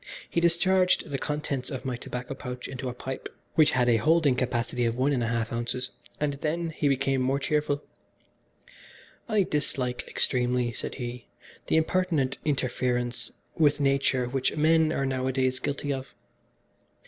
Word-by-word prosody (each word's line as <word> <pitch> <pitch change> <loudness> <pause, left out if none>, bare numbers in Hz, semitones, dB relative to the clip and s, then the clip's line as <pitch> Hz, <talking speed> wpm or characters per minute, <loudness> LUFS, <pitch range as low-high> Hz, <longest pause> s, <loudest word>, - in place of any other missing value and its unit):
He 170 - 0
discharged 180 0 +3
the 135 - -1
contents 145 -3 -2
of 135 -2 -5
my 130 -2 -1
tobacco 125 +2 -5
pouch 125 -2 -6
into 130 -1 -4
a - - -4
pipe 130 +1 -5 0.2
which 155 -1 +5
had 125 -1 +3
a 120 -2 +5
holding 155 +1 +4
capacity 125 -1 -1
of 115 0 0
one 135 +3 +2
and 125 - +1
a 115 - 0
half 115 -1 -1
ounces, 120 +2 -1 0.3
and 145 -1 0
then 165 +2 -1
he 150 -1 0
became 135 -1 +2
more 130 +2 +2
cheerful 145 0 0 1.5
"I 215 -3 +4
dislike 130 -6 -2
extremely," 125 -1 +1
said - - -4
he, 120 -2 -6 0.4
"the - - +2
impertinent 160 -5 +1
interference 125 -3 0 0.2
with 150 -2 +3
nature 135 -2 +2
which 130 +3 0
men 160 +1 +4
are 135 - 0
nowadays 130 0 0
guilty 145 0 -2
of. 135 0 -7
135 Hz, 155 wpm, -27 LUFS, 125-150 Hz, 1.5 s, which